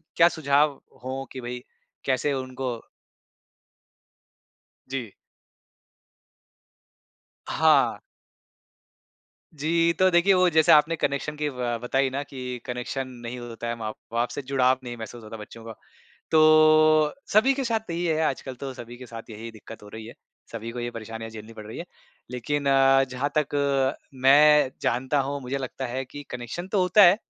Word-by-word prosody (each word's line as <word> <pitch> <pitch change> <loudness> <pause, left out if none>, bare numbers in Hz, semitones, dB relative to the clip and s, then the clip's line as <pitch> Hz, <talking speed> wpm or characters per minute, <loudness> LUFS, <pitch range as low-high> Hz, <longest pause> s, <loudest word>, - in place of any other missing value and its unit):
क्या 165 - +6
सुझाव 145 0 +3 0.3
हो 130 +1 -4
कि 130 - -7
भाई 125 0 -6 0.4
कैसे 135 +2 +1
उनको 130 -1 -4 2.1
जी। 130 -5 -5 2.4
हाँ। - - +3 1.6
जी, 165 +3 +2
तो 185 0 +5
देखिए 175 +3 +4
वो 185 -1 +4
जैसे 160 -2 +4
आपने 155 +2 +5
कनेक्शन 150 0 -2
की 150 0 -2
अ, 125 -4 -2
बताई 135 +2 +1
ना 135 +2 -3
कि 125 -3 -6
कनेक्शन 125 +2 -4 0.2
नहीं 120 +1 -5
होता 120 -1 -7
है, 115 - -2
माँ-बाप 115 +1 -4
से 135 - -5
जुड़ाव 130 -1 +2
नहीं 120 -1 -7
महसूस 115 +1 -9
होता 110 +1 -9
है - - -9
बच्चों 115 +2 -11
का। 115 - -7 0.6
तो 155 -1 +5 0.2
सभी 235 +6 +5
के 270 0 -2
साथ 225 -3 -2
यही 170 +1 -2
है 160 -2 +1
आजकल 135 -2 -3
तो 135 +1 -6
सभी 120 -1 -10
के 125 - -10
साथ 115 -1 -10
यही 110 +2 -8
दिक्कत 110 0 -12
हो - - -12
रही 110 +1 -9
है, 115 - -10 0.4
सभी 115 0 -6
को 120 - -6
ये 120 0 -3
परेशानियाँ 115 0 -7
झेलनी 110 +1 -10
पड़ 110 -1 -10
रही 110 - -8
हैं। 170 - -6 0.5
लेकिन 140 +4 -2
अ, 135 0 +5
जहाँ 130 +2 -3
तक 150 -1 0 0.7
मैं 150 0 +6
जानता 130 +4 0
हूँ 140 +1 -3
मुझे 130 +2 -3
लगता 130 0 -5
है 130 +2 -4
कि 145 +3 -10
कनेक्शन 125 +9 -6
तो 195 0 +1
होता 180 +3 +6
है 180 +2 +7
130 Hz, 160 wpm, -25 LUFS, 120-150 Hz, 2.4 s, है